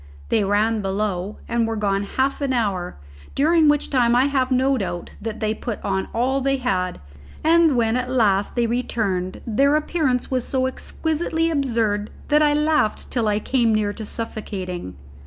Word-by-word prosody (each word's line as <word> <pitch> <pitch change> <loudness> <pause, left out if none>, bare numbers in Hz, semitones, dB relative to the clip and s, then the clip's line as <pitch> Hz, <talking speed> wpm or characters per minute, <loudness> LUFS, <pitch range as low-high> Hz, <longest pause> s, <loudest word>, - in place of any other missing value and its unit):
They 215 - +2
ran 210 +2 +1
below, 195 0 -2
and 230 -1 0
were 225 - -2
gone 200 -2 0
half 265 +8 -1
an 275 -2 0
hour, 200 - -1 0.4
during 320 +2 +4
which 295 0 +1
time 240 -3 +3
I 250 +2 +4
have 270 -2 +1
no 265 +1 +2
doubt 185 -7 -4
they 215 0 -2
put 220 0 -5
on 190 -1 -1
all 260 +4 0
they 275 +1 +1
had; 185 -8 -1 0.4
and 325 -2 +4
when 225 -1 +2
at 250 0 -1
last 205 -6 +2
they 240 -1 +2
returned, 215 -6 -2
their 275 +6 +3
appearance 300 -5 0
was 255 -2 0
so 260 0 -1
exquisitely 320 +4 -1
absurd 230 -8 0 0.2
that 300 0 +4
I 295 -1 +4
laughed 300 -7 +1
till 235 -4 0
I 205 -1 +2
came 230 0 +1
near 205 -1 0
to 220 - -6
suffocating. 190 - -5
235 Hz, 170 wpm, -22 LUFS, 205-275 Hz, 0.4 s, during